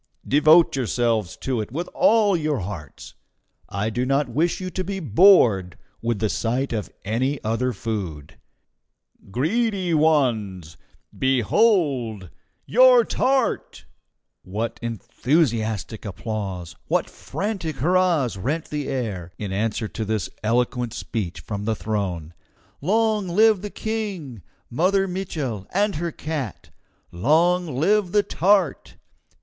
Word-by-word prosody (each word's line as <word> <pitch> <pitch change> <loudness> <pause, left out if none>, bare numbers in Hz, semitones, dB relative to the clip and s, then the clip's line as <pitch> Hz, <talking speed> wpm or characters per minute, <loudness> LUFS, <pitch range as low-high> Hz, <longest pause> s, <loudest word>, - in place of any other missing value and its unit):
Devote 155 +4 +5
yourselves 115 -6 0
to 130 -4 -2
it 105 - -7
with 170 +7 -3
all 225 -7 +4
your 150 - -1
hearts. 90 -7 -8 0.6
I 100 +3 -2
do 120 +3 -1
not 135 +2 +1
wish 155 +8 0
you 185 -1 -5
to 185 +3 -3
be 195 +1 -4
bored 115 - +5 0.2
with 115 -1 -1
the 110 - 0
sight 120 +5 -1
of 105 -3 -3 0.2
any 130 +7 0
other 115 +4 0
food. 90 - -5 0.9
"Greedy 185 - 0
ones! 115 - +1 0.4
behold 130 - +1 0.3
your 250 +1 +6
TART!" 265 -2 0 0.6
What 110 +4 -4
enthusiastic 115 - -1
applause, 100 -5 -5
what - - +1
frantic 190 -7 -4
hurrahs 165 - +2
rent 145 - -3
the 150 -2 -3
air, 105 -10 -3
in 100 -3 -4
answer 110 +2 -1
to 110 - -4
this 110 -3 -2
eloquent 120 +1 0
speech 105 -7 -4
from 105 -1 -5
the 110 0 0
throne! 95 -7 -3 0.5
"Long 215 +3 +1
live 215 +2 +4
the 205 - -5
King, 195 - -4 0.3
Mother 190 +9 +1
Mitchel, 155 - -4
and 200 -2 +1
her 170 +1 -2
cat! 150 - -5 0.4
Long 160 - +2
live 190 +6 +2
the 205 -1 +4
tart! 190 -4 +1
130 Hz, 120 wpm, -23 LUFS, 110-180 Hz, 0.9 s, your